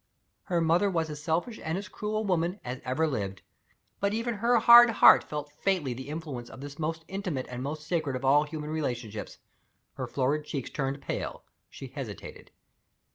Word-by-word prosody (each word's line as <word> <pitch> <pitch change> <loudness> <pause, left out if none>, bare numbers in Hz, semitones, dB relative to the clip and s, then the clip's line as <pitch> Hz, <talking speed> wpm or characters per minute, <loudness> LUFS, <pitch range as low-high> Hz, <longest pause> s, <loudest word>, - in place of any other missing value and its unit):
Her 175 -3 0
mother 170 +5 +3
was 165 -4 -1
as 150 0 -7
selfish 175 +9 -1
and 160 +3 -1
as 195 0 -5
cruel 215 0 -3
a - - +1
woman 180 -1 0
as 125 +1 -5
ever 130 +5 0
lived. 100 -10 -3 0.6
But 200 +1 0
even 230 +1 -1
her 235 +3 +3
hard 235 +1 +9
heart 225 - +7
felt 150 -1 -6
faintly 180 -10 +1
the 130 +3 -8
influence 150 -6 -6
of - - -11
the 140 +1 -8
most 160 +1 -3
intimate 185 -9 -3
and 125 0 -5
most 150 +3 -5
sacred 155 -5 -1
of 130 +1 -4
all 145 +2 +5
human 150 0 -6
relationships. 120 -8 -4 0.6
Her - - -5
florid 140 +3 0
cheeks 140 -3 -5
turned 140 -1 -3
pale. - - -4 0.3
She - - -9
hesitated. - - -8
155 Hz, 185 wpm, -28 LUFS, 135-185 Hz, 0.6 s, hard